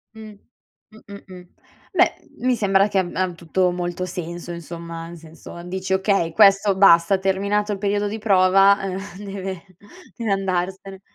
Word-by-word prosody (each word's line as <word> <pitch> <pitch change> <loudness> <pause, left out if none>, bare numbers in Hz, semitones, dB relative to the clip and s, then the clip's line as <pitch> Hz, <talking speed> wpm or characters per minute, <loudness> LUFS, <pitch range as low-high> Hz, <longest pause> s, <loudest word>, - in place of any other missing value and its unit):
Mh. 215 -1 -11 0.6
Mh, 220 - -16
mh, 200 0 -11
mh. 180 -1 -11 0.5
Beh, - - +3 0.3
mi 255 0 +1
sembra 195 -1 +2
che 195 -2 0
ab 175 -2 -3
ha 185 -1 0
tutto 180 +2 -1
molto 175 0 -4
senso 175 -1 -7
insomma, 170 0 -8
nel 170 0 -10
senso 165 +1 -12
dici 190 +1 -4
okay, 190 -3 +1
questo 195 0 +4
basta, 190 0 +5
terminato 200 +2 -1
il - - -4
periodo 205 0 -1
di 215 +2 -4
prova, 195 -1 +4
ehm 190 -1 -4 0.3
deve 195 -2 -6 0.5
deve 230 -4 -3
andarsene. 190 0 -3
190 Hz, 155 wpm, -21 LUFS, 175-200 Hz, 0.6 s, basta